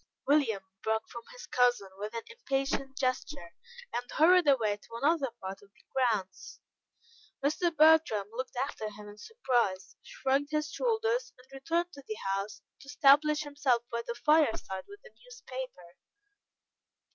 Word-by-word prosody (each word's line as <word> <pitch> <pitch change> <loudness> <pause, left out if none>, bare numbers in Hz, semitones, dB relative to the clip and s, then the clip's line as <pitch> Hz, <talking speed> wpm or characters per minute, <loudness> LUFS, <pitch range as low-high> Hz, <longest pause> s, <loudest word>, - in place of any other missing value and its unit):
William 265 -9 +2 0.2
broke 220 0 -1
from 235 - -8
his - - -10
cousin 245 -6 +2
with 210 +3 -5
an 230 - -3
impatient 275 - -2
gesture, 255 - -2 0.4
and 245 +1 -3
hurried 350 +1 +5
away 225 -7 +3
to 230 +2 -13
another 280 +2 +1
part 190 0 -7
of 200 - -19
the - - -26
grounds. 225 -8 -1 0.9
Mr. 315 +4 +2
Bertram 310 -10 +5
looked 255 +3 -5
after 245 -4 -3
him 210 0 -11
in 205 0 -12
surprise, 240 - -1
shrugged 275 +2 -1
his 305 0 -1
shoulders, 465 +2 0
and 250 - -18
returned 335 +6 -1
to 280 - -10
the 215 - -4 0.2
house, 200 +1 -4 0.2
to - - -15
establish 295 +1 +5
himself 285 -5 0
by 235 0 -1
the 235 - -3
fireside 240 -9 +1
with 405 0 -13
a 485 - -15
newspaper. 260 - -9
265 Hz, 145 wpm, -30 LUFS, 220-305 Hz, 0.9 s, hurried